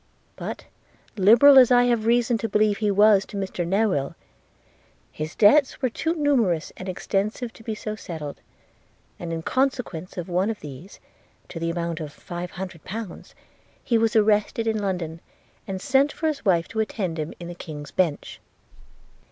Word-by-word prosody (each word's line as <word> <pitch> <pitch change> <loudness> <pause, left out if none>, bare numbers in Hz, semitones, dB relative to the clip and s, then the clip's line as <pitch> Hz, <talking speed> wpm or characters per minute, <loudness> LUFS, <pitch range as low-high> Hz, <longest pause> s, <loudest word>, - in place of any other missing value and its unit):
'But, - - -6 0.5
liberal 235 +8 +7
as 250 - +6
I 245 0 +6
have 235 -3 +1
reason 235 0 +2
to 225 - -3
believe 210 -1 +2
he 210 -1 +1
was 205 0 +5
to 205 - -7
Mr 190 -3 -3
Newill, 190 -8 0 1.0
his 155 +1 -6
debts 260 +7 +4
were 255 -3 0
too 325 +7 -1
numerous 240 - +1
and 185 - -7
extensive 210 +5 -2
to - - -15
be 220 -1 -4
so 215 0 -5
settled; 160 -8 -7 0.8
and, 170 -1 -5
in 165 0 -4
consequence 250 - -2
of 175 - -4
one 185 +3 0
of 225 - -4
these, 145 +6 -10 0.5
to 165 - -7
the 165 0 -1
amount 170 0 -3
of 155 -3 -6
five 175 +3 -7
hundred 185 -3 -8
pounds, 215 -1 -8 0.5
he 230 -2 +2
was 225 0 +1
arrested 215 +1 +2
in 220 -1 0
London, 175 -5 -3 0.5
and 190 -1 -4
sent 275 +6 +2
for - - -5
his 310 -2 -1
wife 175 -5 +2
to 220 - -4
attend 190 -6 -2
him 155 +1 -3
in 170 - -7
the 175 - -6
King's 150 -4 -9
Bench. 170 -6 -1
200 Hz, 170 wpm, -24 LUFS, 170-225 Hz, 1.0 s, liberal